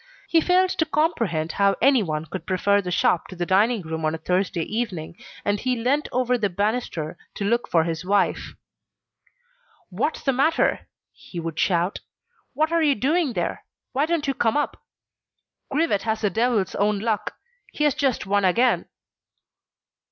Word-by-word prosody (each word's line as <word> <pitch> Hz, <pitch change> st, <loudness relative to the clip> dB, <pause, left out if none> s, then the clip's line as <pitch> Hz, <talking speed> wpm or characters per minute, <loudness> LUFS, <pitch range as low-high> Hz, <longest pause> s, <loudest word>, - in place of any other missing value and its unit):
He 330 Hz, -, +4 dB
failed 370 Hz, +2 st, +3 dB
to 320 Hz, -, 0 dB
comprehend 230 Hz, -, 0 dB
how 200 Hz, 0 st, +2 dB
anyone 200 Hz, -, +2 dB
could 160 Hz, +1 st, -7 dB
prefer 200 Hz, +2 st, +2 dB
the 180 Hz, -, -5 dB
shop 175 Hz, -1 st, +1 dB
to 185 Hz, -, -10 dB
the 175 Hz, 0 st, -2 dB
dining 205 Hz, +3 st, +2 dB
room 160 Hz, 0 st, -5 dB
on 155 Hz, +1 st, 0 dB
a -, -, -4 dB
Thursday 180 Hz, +1 st, -1 dB
evening, 190 Hz, -7 st, -4 dB, 0.3 s
and 205 Hz, 0 st, +1 dB
he 255 Hz, +2 st, 0 dB
leant 255 Hz, +6 st, 0 dB
over 250 Hz, 0 st, +1 dB
the 205 Hz, -2 st, +1 dB
banister, 195 Hz, -5 st, -2 dB, 0.2 s
to 200 Hz, -, -3 dB
look 235 Hz, +3 st, +1 dB
for 165 Hz, -2 st, +3 dB
his 165 Hz, 0 st, -3 dB
wife. 195 Hz, +1 st, 0 dB, 1.4 s
"What's 225 Hz, -, -2 dB
the 270 Hz, -, +2 dB
matter?" 295 Hz, +6 st, +1 dB, 0.3 s
he 175 Hz, -, -9 dB
would 165 Hz, -1 st, -5 dB
shout. 175 Hz, +1 st, +1 dB, 0.6 s
"What 310 Hz, +2 st, +1 dB
are 335 Hz, 0 st, +2 dB
you 295 Hz, -3 st, +3 dB
doing 290 Hz, +3 st, +1 dB
there? 175 Hz, -4 st, -3 dB, 0.3 s
Why 280 Hz, +4 st, +1 dB
don't 330 Hz, -3 st, 0 dB
you 275 Hz, -, +1 dB
come 235 Hz, -1 st, +1 dB
up? 295 Hz, -, -2 dB, 0.9 s
Grivet 280 Hz, -9 st, +1 dB
has 220 Hz, 0 st, -2 dB
the 205 Hz, -3 st, +1 dB
devil's 225 Hz, -4 st, +1 dB
own 205 Hz, +1 st, +1 dB
luck. 215 Hz, +1 st, -2 dB, 0.4 s
He 300 Hz, -, -2 dB
has 295 Hz, -2 st, +4 dB
just 275 Hz, -7 st, 0 dB
won 200 Hz, +1 st, +1 dB
again." 235 Hz, +7 st, +2 dB
210 Hz, 165 wpm, -24 LUFS, 180-270 Hz, 1.4 s, He